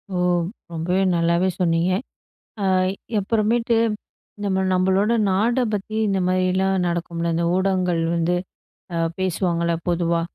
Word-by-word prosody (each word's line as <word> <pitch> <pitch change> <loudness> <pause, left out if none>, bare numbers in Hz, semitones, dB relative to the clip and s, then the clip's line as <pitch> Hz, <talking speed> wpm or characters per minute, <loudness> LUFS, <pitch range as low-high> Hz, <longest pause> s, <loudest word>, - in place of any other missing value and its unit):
ஓ! - - 0 0.5
ரொம்பவே 170 +3 -1 0.2
நல்லாவே 170 +2 +2
சொன்னீங்க. 170 0 +2 0.7
அ - - 0 0.5
அப்புறமேட்டு 230 +3 +1 0.7
நம்ம 190 -1 +1
நம்மளோட 190 +4 +2 0.2
நாட 215 +6 +2 0.2
பத்தி 210 +2 -4
இந்த 195 -1 +1
மாதிரிலாம் 185 0 +1
நடக்கும்ல. 170 -1 -2
இந்த 170 +1 0
ஊடகங்கள் 185 -3 +1
வந்து 170 +1 +1 0.6
அ - - 0 0.2
பேசுவாங்கல்ல 170 -2 0
பொதுவா. 170 -1 +1
185 Hz, 110 wpm, -22 LUFS, 170-195 Hz, 0.7 s, நல்லாவே